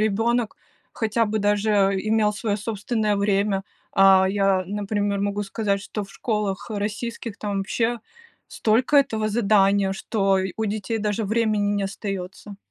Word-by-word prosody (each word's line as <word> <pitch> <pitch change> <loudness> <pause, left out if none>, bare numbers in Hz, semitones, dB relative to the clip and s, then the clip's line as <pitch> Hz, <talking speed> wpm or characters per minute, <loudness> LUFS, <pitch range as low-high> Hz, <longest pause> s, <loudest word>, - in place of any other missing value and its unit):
ребенок 225 +2 0 0.4
хотя 225 +1 0
бы 215 0 -1
даже 205 +1 +1 0.3
имел 215 +1 +1
свое 210 -1 -2
собственное 215 0 -1
время? 200 -1 +1 0.3
А, 195 -1 +6
я, 195 -1 +2
например, 205 0 -1
могу 205 +1 -1
сказать, 200 0 -1
что 210 0 -5
в 195 - -16
школах, 210 -3 -3
э, 210 - -3
российских 220 +1 -4
там 205 -2 -2
вообще 225 +4 -1 0.5
столько 235 +6 +2
этого 220 -6 +2
задания, 200 -3 +3
что 195 -1 0
й 190 -1 -2
у 220 - -1
детей 215 +1 -2
даже 210 +1 -1
времени 210 -1 +1
не 200 - -1
остается. 195 0 -6
205 Hz, 145 wpm, -23 LUFS, 195-220 Hz, 0.5 s, А